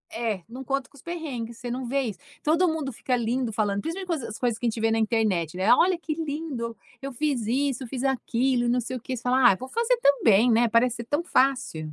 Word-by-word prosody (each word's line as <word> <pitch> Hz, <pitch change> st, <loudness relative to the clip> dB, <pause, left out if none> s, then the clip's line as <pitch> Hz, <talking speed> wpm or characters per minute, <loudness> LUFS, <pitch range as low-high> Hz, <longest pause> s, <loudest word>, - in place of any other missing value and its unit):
é, 220 Hz, -6 st, -2 dB
não 255 Hz, +3 st, -8 dB
conta 275 Hz, 0 st, -2 dB
com -, -, -23 dB
os 265 Hz, -, -15 dB
perrengues. 270 Hz, -10 st, -5 dB
Você 245 Hz, 0 st, -6 dB
não 255 Hz, +1 st, -3 dB
vê 275 Hz, +3 st, +1 dB
isso, 210 Hz, -7 st, -5 dB, 0.2 s
todo 330 Hz, +4 st, +3 dB
mundo 315 Hz, -4 st, -2 dB
fica 250 Hz, +2 st, -1 dB
lindo 240 Hz, +1 st, -1 dB
falando, 205 Hz, -2 st, 0 dB
principalmente 335 Hz, -3 st, -3 dB
com -, -, -5 dB
as 215 Hz, -, -7 dB
coisas 235 Hz, -3 st, 0 dB
que 240 Hz, -, -1 dB
a -, -, +3 dB
gente 225 Hz, -, -4 dB
vê 225 Hz, -, +2 dB
na 225 Hz, -, +2 dB
internet, 205 Hz, -7 st, 0 dB
né. 190 Hz, +5 st, +5 dB
"Olha 360 Hz, +5 st, +4 dB
que 325 Hz, -2 st, -4 dB
lindo, 290 Hz, -7 st, -4 dB, 0.2 s
eu 275 Hz, 0 st, -5 dB
fiz 250 Hz, -4 st, -1 dB
isso, 270 Hz, +1 st, 0 dB
eu -, -, -7 dB
fiz 255 Hz, +1 st, -5 dB
aquilo, 255 Hz, -2 st, +1 dB
não 250 Hz, -, +2 dB
sei 250 Hz, +2 st, -4 dB
o -, -, -11 dB
quê" 255 Hz, +2 st, -4 dB
fala: 250 Hz, +1 st, +4 dB
"Ah, -, -, -3 dB
vou 255 Hz, +6 st, -8 dB
fazer 470 Hz, +1 st, +1 dB
também, 240 Hz, -, +4 dB
né." 230 Hz, +1 st, +4 dB
Parece 235 Hz, +1 st, +3 dB
ser 235 Hz, -, -6 dB
tão 290 Hz, +7 st, -1 dB
fácil. 255 Hz, -, +1 dB
250 Hz, 245 wpm, -26 LUFS, 230-280 Hz, 0.2 s, né